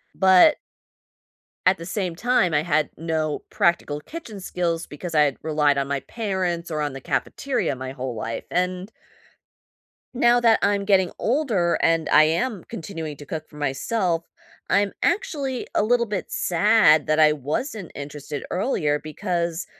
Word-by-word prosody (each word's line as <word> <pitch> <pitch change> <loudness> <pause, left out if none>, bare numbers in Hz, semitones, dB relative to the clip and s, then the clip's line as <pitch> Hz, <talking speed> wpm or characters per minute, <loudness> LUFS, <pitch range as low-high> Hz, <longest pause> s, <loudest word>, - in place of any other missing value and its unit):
But 190 - +6 1.1
at 185 +1 +4
the 165 - -8
same 185 -2 -3
time, 215 -5 +2
I 150 - +2
had 155 -3 +1
no 160 -2 -2
practical 150 -4 +1
kitchen 235 - -9
skills 175 -2 -2
because 160 +3 -7
I 150 - +6
had 145 -3 +2
relied 150 -2 +2
on 140 0 0
my 140 -1 -2
parents 185 - -3
or 155 -2 -2
on 145 -2 -2
the 135 - -8
cafeteria 255 - -1
my 130 0 -6
whole 130 -2 -5
life, 115 +1 -4
and 180 +3 -1 1.2
now 240 -1 +4
that 230 -2 +4
I'm 200 -1 +1
getting 190 -3 +3
older 225 - +1
and 165 -1 +2
I 155 - +7
am 190 +5 -1
continuing 165 -7 -6
to 145 - -11
cook 155 +2 -6
for 150 - -14
myself, 165 +5 -1 0.5
I'm 200 +1 +2
actually 305 - -1
a - - +3
little 235 +2 +2
bit 205 -4 -4
sad 175 -4 +4
that 155 +1 +2
I 155 -1 +6
wasn't 170 - -4
interested 145 0 -6
earlier, 175 - 0
because 170 +1 -3
170 Hz, 155 wpm, -23 LUFS, 150-205 Hz, 1.2 s, I